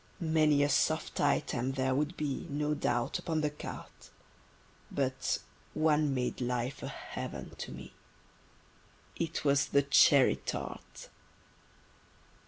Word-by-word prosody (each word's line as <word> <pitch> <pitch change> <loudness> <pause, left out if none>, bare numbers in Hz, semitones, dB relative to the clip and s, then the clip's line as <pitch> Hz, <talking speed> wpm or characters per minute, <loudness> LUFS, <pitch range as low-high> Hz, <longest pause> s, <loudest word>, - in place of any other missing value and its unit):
Many 155 -3 +3
a 145 - +2
soft 155 +3 +1
item 135 -2 +1
there 130 -1 0
would 150 +6 -1
be, 145 -3 -3
No 150 +1 0
doubt, 120 -5 0
upon 160 -2 -1
the 150 -1 0
carte: 150 - -9 0.8
But 130 -1 -1 0.4
one 155 -2 +3
made 125 0 -2
life 125 +1 -2
a - - -4
heaven - - -6
to - - -5
me: - - -10 1.2
It 165 -2 -3
was 140 0 +3
the 140 - +3
cherry 140 - +6
tart. 65 - -6
140 Hz, 120 wpm, -31 LUFS, 130-150 Hz, 1.2 s, cherry